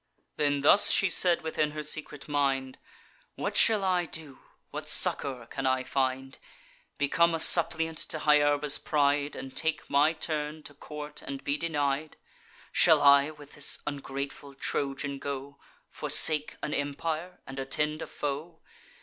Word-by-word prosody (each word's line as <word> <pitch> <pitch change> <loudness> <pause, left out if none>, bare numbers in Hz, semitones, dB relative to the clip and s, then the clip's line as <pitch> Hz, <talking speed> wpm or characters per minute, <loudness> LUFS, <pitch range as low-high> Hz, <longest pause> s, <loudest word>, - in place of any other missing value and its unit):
Then 145 -2 0
thus 200 +8 +6
she 195 -2 +3
said 175 -1 +1
within 155 -1 -1
her 150 - -3
secret 150 -1 -3
mind: 135 -3 -1 0.6
"What - - -4
shall 215 -3 +5
I 180 -2 +1
do? 155 -4 -6 0.3
what - - -6
succour 130 -4 0
can 135 +3 -4
I 130 0 +1
find? 135 0 -2 0.6
Become 165 +4 +2
a - - -3
suppliant 165 -1 +5
to 160 - -3
Hyarba's 145 -1 +3
pride, 145 -1 0
And 135 - -9
take 160 -1 -2
my 150 +3 +3
turn, 155 -1 -4
to 145 - -12
court 150 +1 -9
and 135 -1 -7
be 140 - 0
denied? 150 -2 -2 0.5
Shall - - +5
I 140 0 +5
with 150 -2 -13
this 145 - -1
ungrateful 140 -1 -6
Trojan 140 0 -3
go, 140 0 -6 0.3
Forsake 155 -1 +2
an 150 - -3
empire, 155 +5 -4
and 135 0 -8
attend 150 +3 -2
a - - -5
foe? 150 +3 -5
145 Hz, 145 wpm, -28 LUFS, 140-155 Hz, 0.6 s, thus